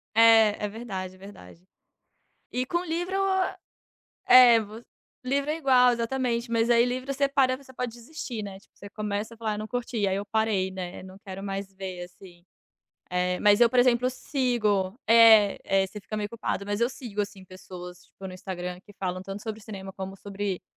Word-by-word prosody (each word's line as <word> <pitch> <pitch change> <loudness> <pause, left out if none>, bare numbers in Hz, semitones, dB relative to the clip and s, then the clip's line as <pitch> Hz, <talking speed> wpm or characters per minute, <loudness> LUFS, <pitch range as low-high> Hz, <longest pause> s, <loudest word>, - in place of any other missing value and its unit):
É, 225 -2 +6
é - - 0
verdade, 195 -4 -6
é - - -18
verdade. 185 - -13 0.9
E 255 +1 -1
com 345 +4 -1
livro 350 +3 -3 1.1
É, 245 -2 +8
vo 215 +2 -9 0.4
Livro 280 +3 0
é 310 - -1
igual, 255 -5 +5
exatamente, 235 0 -1
mas 230 +1 +2
aí 235 0 +5
livro 255 +2 -3
você 280 0 +1
para, 265 -2 +2
você 265 -1 -16
pode 250 -2 -4
desistir, 240 -2 -7
né. 195 -1 -8
Tipo, - - -28
você 200 - -11
começa 210 +2 -4
e - - -19
fala: 225 -1 -3
"Ah, - - -2
eu - - -5
não 215 - -5
curti." 230 -3 -2
Aí 190 - +1
eu 200 - -3
parei, 210 -3 0
né. 185 -1 -7
Não 190 0 -12
quero 190 +1 -7
mais 195 0 -5
ver, 190 -2 -6
assim. 175 -1 -16 0.7
Eh, 180 0 0
mas 205 +1 +4
eu, 235 - +7
por 250 - +2
exemplo, 245 0 +3
sigo 235 -7 -1
É, 225 -3 +7 0.3
é, 190 - -3
você 210 - -9
fica 215 - -6
meio 205 -1 -2
culpado. 220 -3 -3
Mas 205 +2 -2
eu 235 - +3
sigo, 225 -6 -5
assim, 200 -2 -7
pessoas, 180 -1 -10
tipo, 190 - -11
no 185 - -8
Instagram, 180 -1 -6
que 205 - -16
falam 185 -1 -3
tanto 195 +2 -7
sobre 220 -1 -6
cinema 195 -3 -8
como 190 0 -7
sobre 200 -1 -4
210 Hz, 195 wpm, -26 LUFS, 190-245 Hz, 1.1 s, É